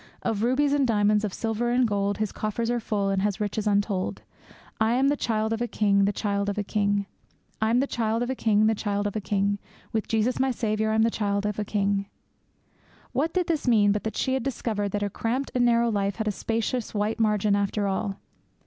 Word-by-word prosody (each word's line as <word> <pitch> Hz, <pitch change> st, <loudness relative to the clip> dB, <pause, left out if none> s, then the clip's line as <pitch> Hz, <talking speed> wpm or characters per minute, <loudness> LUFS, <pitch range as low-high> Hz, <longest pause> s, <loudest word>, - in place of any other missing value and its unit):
Of 225 Hz, -3 st, -1 dB
rubies 270 Hz, +5 st, +2 dB
and 280 Hz, -2 st, +2 dB
diamonds, 210 Hz, -1 st, +3 dB
of 210 Hz, -, -1 dB
silver 225 Hz, +3 st, -1 dB
and 245 Hz, 0 st, +3 dB
gold, 200 Hz, -1 st, 0 dB
His 215 Hz, -2 st, -1 dB
coffers 230 Hz, +2 st, -2 dB
are 240 Hz, -, 0 dB
full 205 Hz, -3 st, -1 dB
He 195 Hz, -1 st, +1 dB
has 205 Hz, +1 st, 0 dB
riches 210 Hz, 0 st, -2 dB
untold. 200 Hz, -2 st, 0 dB, 0.6 s
I'm 240 Hz, +5 st, +3 dB
the 290 Hz, -, +2 dB
child 220 Hz, -4 st, 0 dB
of 225 Hz, -, -3 dB
a 240 Hz, -, 0 dB
King! 200 Hz, -3 st, +2 dB
the 200 Hz, -, +2 dB
child 200 Hz, -1 st, -1 dB
of 200 Hz, -, -3 dB
a 210 Hz, -, 0 dB
King! 205 Hz, 0 st, 0 dB, 0.6 s
With 235 Hz, +5 st, +2 dB, 2.2 s
Jesus 225 Hz, +3 st, +1 dB
my 265 Hz, 0 st, +2 dB
Saviour, 220 Hz, -3 st, 0 dB
I'm 220 Hz, 0 st, +3 dB
the 230 Hz, -, +2 dB
child 200 Hz, -1 st, -1 dB
of 210 Hz, 0 st, -2 dB
a -, -, 0 dB
King! 200 Hz, -1 st, 0 dB, 1.0 s
What 315 Hz, +5 st, 0 dB
did 365 Hz, 0 st, 0 dB
this 320 Hz, -5 st, -1 dB
mean 210 Hz, -4 st, +5 dB
but 205 Hz, 0 st, -1 dB
that 220 Hz, -1 st, -4 dB
she 260 Hz, -, 0 dB
had 265 Hz, -, 0 dB
discovered 225 Hz, -5 st, -2 dB
that 205 Hz, 0 st, 0 dB
her 205 Hz, -, -1 dB
cramped 250 Hz, +7 st, -2 dB
and 245 Hz, -1 st, +3 dB
narrow 235 Hz, -1 st, +3 dB
life 200 Hz, -1 st, 0 dB
had 220 Hz, -1 st, -3 dB
a -, -, +2 dB
spacious 225 Hz, +2 st, -2 dB
white 210 Hz, +2 st, 0 dB
margin 210 Hz, -2 st, +2 dB
after 200 Hz, +1 st, 0 dB
all? 195 Hz, +1 st, -1 dB
215 Hz, 190 wpm, -26 LUFS, 205-235 Hz, 2.2 s, mean